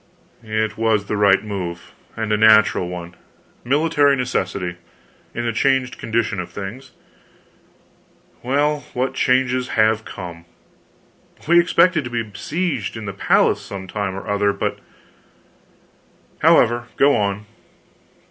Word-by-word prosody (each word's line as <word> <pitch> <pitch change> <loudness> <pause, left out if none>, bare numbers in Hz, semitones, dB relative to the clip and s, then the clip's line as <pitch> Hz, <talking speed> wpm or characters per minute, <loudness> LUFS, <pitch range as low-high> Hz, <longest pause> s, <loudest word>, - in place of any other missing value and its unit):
"It 110 -1 -2
was 110 -3 +1
the 105 - -3
right 100 -1 +4
move 90 -5 -6 0.2
and 110 -1 -2
the - - +4
natural 110 -4 +4
one; 85 -1 -7 0.5
military 145 +1 +2
necessity, 95 -8 -2 0.6
in 120 - -3
the 115 - -1
changed 130 +1 +1
condition 115 -2 -1
of 90 - -5
things. 120 +7 -8 1.5
Well, 145 +4 +1 0.2
what 130 +2 -1
changes 130 -1 +1
have 110 0 +3
come! 85 -4 -9 1.0
We 170 +2 +6
expected 170 -1 +3
to - - -5
be 120 -1 -2
besieged 115 - -3
in 110 - -7
the 100 - -5
palace 100 - +2
some 95 -1 -8
time 100 0 -3
or 100 - -8
other, 100 0 +1
but - - -3 1.6
however, 120 +1 +3
go 140 +1 +4
on." 100 0 -1
110 Hz, 125 wpm, -20 LUFS, 100-130 Hz, 1.6 s, We